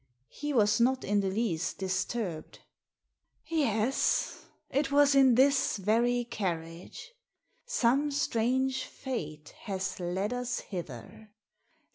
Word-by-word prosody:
He 295 0 -4
was 210 -5 +3
not 260 +2 +2
in 205 +1 +1
the 195 -1 0
least 190 -5 -1
disturbed. 185 -2 -3 0.9
"Yes, 265 -6 0 0.3
it 275 0 0
was 285 0 +5
in 265 -3 +6
this 270 -1 +3
very 235 +5 +1
carriage. 170 - -5 0.5
Some 280 - +2
strange 260 -1 0
fate 155 - -6 0.2
has 190 -3 -3
led 185 +5 -2
us 250 0 -3
hither. 175 - -8
225 Hz, 105 wpm, -30 LUFS, 190-265 Hz, 0.9 s, in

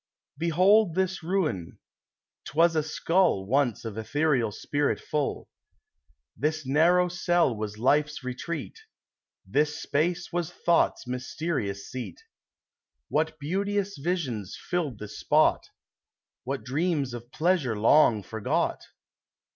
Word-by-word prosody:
] - - -52
Behold 185 +2 +4
this 190 0 0
ruin! 160 - -2 0.7
'T - - -9
was 165 +1 +4
a 155 - +3
skull 165 - +1
Once 125 -1 +1
of 110 -1 -5
ethereal 135 -1 +1
spirit 145 +7 -1
full. 150 -2 -2 0.9
This 155 +4 -1
narrow 170 +6 +4
cell 175 -6 +1
was 105 -1 -5
Life's 145 +4 +1
retreat; 155 - -5 0.7
This 150 +1 0
space 170 +4 -1
was 175 -1 -1
Thought's 170 -5 +1
mysterious 125 -5 -3
seat. 120 -9 -7 0.9
What 155 +1 0
beauteous 200 +6 -1
visions 135 - -2
filled 160 - -1
this 105 -1 -8
spot! - - +3 0.8
What 135 +1 -3
dreams 145 -1 -1
of 120 +1 -9
pleasure 155 - +1
long 115 -1 +4
forgot 110 +3 -1
150 Hz, 115 wpm, -27 LUFS, 125-175 Hz, 0.9 s, Behold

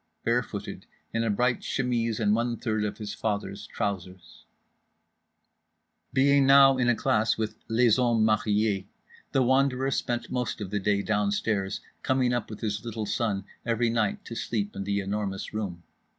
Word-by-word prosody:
Bare 120 +1 +2
footed, 105 -3 -7 0.3
in 115 - +1
a 115 - 0
bright 120 +4 +1
chemise 120 -4 -1
and 105 -2 +3
one 115 +1 0
third 110 -1 -1
of 105 - -3
his 105 -2 -5
father's 100 -2 -3
trousers…. 95 -3 -5 1.7
Being 140 +1 +4
now 135 -1 +7
in 120 -1 +3
a 120 - +4
class 110 0 +1
with 110 -1 -3
"les 115 0 +4
hommes 120 -3 +3
mariés" 105 -2 +1 0.4
The 135 - +3
Wanderer 130 +1 +2
spent 120 -1 -2
most 125 -2 -2
of 100 -3 -5
the 105 - 0
day 100 0 +1
downstairs, 105 -1 0 0.2
coming 130 -2 +1
up 120 - -2
with 105 - -8
his 105 -1 -2
little 115 -2 -4
son 100 -4 -1 0.2
every 115 0 +1
night 110 -3 0
to - - -7
sleep 105 -3 -3
in 100 - -4
The 100 0 0
Enormous 100 -1 -3
Room. 95 -6 -4
110 Hz, 165 wpm, -27 LUFS, 100-120 Hz, 1.7 s, now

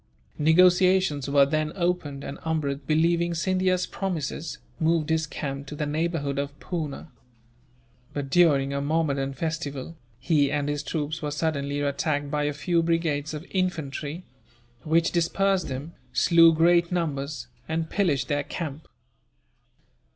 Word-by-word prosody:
Negotiations 180 -2 +4
were 140 0 +5
then 155 +2 -1
opened, 170 -6 -1
and 140 - -6
Amrud, 150 -3 -2
believing 170 +2 +2
Scindia's 185 +1 +1
promises, 165 -4 -4 0.2
moved 160 -1 +1
his 160 0 +1
camp 140 -1 -5
to 150 - -6
the 150 - -2
neighbourhood 150 -2 -1
of 145 +1 -4
Poona. 160 -3 -5 1.0
But, 140 -2 -5
during 140 -5 +4
a 140 - -1
Mahommedan 140 -2 0
festival, 155 0 -4 0.2
he 145 -3 +2
and 145 -1 0
his 145 -1 -1
troops 155 0 -3
were 150 - -2
suddenly 145 -2 -1
attacked 145 0 -1
by 150 0 0
a 145 - +1
few 170 +4 +1
brigades 160 -3 0
of 150 +3 -7
infantry; 165 -3 -2 0.6
which 165 +1 +2
dispersed 185 +2 +1
them, 140 +5 -6 0.2
slew 165 -1 +6
great 170 +2 +3
numbers, 145 -6 -2 0.2
and 160 0 -1
pillaged 165 -8 0
their 145 -2 0
camp. 155 -1 -6
155 Hz, 135 wpm, -26 LUFS, 145-170 Hz, 1.0 s, slew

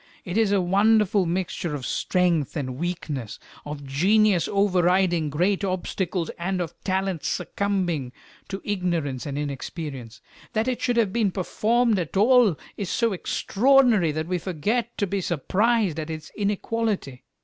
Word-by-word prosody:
It 180 - -4
is 220 -2 +3
a 200 - +3
wonderful 205 +1 +3
mixture 170 -2 -2
of 135 -3 -5
strength 170 -5 0
and 130 -3 -4
weakness, 155 - -4 0.3
of 145 -1 -6
genius 190 +6 +3
overriding 180 -4 +2
great 180 +7 +1
obstacles 185 -2 -2
and 185 +2 -1
of 175 -3 -3
talent 190 -3 -1
succumbing 180 -10 -1 0.4
to 195 0 -6
ignorance 170 -10 -2
and 140 0 -4
inexperience. 140 -4 -5 0.3
That 220 +2 0
it 255 -1 -1
should 245 -1 +1
have 215 -5 +2
been 225 -4 +2
performed 220 +4 +1
at 175 +2 -3
all 225 - +5 0.2
is 200 -4 -3
so 230 -3 +1
extraordinary 225 - +3
that 155 +1 -3
we 180 +1 -1
forget 210 +8 -2
to 205 - +1
be 195 0 -2
surprised 185 - +1
at 155 0 -5
its 155 -1 -7
inequality. 205 - -2
185 Hz, 145 wpm, -24 LUFS, 160-205 Hz, 0.4 s, all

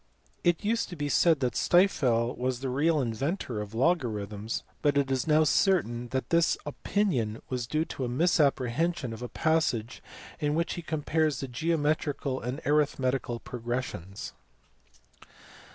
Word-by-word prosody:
It 175 +3 +2
used 230 +2 0
to 180 - -7
be 145 -2 -3
said 160 -1 +4
that 125 -1 +1
Stifel 130 -10 +3
was 125 0 -2
the 135 - -2
real 150 +5 +2
inventor 125 - -2
of 105 +1 -8
logarithms, 110 - -1 0.2
but 145 -1 +2
it 140 -1 +1
is 130 +1 0
now 155 0 +5
certain 140 - +2
that 130 +2 -3
this 170 0 +3
opinion 145 - -1
was 125 -2 -2
due 155 +5 0
to 130 - -4
a - - -3
misapprehension 150 -1 +1
of 110 - -9
a 125 - -5
passage 155 -8 0 0.4
in 150 0 0
which 170 +1 0
he 175 - -5
compares 155 -1 0
geometrical 145 0 -1
and 125 +6 -4
arithmetical 135 -5 +1
progressions. 120 -6 -5
135 Hz, 140 wpm, -28 LUFS, 120-160 Hz, 0.4 s, now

